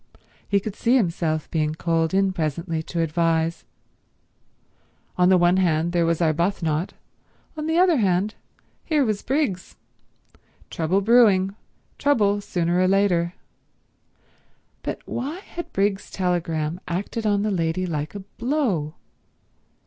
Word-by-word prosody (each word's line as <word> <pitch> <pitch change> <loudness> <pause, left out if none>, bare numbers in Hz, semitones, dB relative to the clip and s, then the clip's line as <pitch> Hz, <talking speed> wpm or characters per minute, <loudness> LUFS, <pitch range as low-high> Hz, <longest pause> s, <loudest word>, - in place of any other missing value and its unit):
He 200 - +3
could 205 0 -6
see 240 +2 +2
himself 165 - 0
being 155 -1 0
called 165 -1 0
in 195 0 +2
presently 160 0 -2
to 165 +1 -3
advise. 165 0 0 1.5
On 180 0 +4
the 190 - +6
one 175 +1 +4
hand 170 -2 +1
there 170 -1 +2
was 165 0 0
Arbuthnot, 165 0 0 0.6
on 305 0 -4
the 320 +1 +1
other 355 -3 +5
hand 195 -1 +1 0.5
here 300 -4 +2
was 215 -3 -1
Briggs. 265 - -2 1.0
Trouble 170 +4 0
brewing, 200 -4 +4 0.4
trouble 205 -8 +2
sooner 175 -2 0
or 185 - +3
later. 185 -3 +2 1.5
But - - -5
why 280 +8 -4
had 345 -3 -8
Briggs's 195 0 0
telegram 170 -3 -1
acted 200 +5 -3
on 205 -1 +2
the 215 - 0
lady 170 0 0
like 155 -1 -4
a 200 - -5
blow? 210 - -2
185 Hz, 125 wpm, -23 LUFS, 165-205 Hz, 1.5 s, the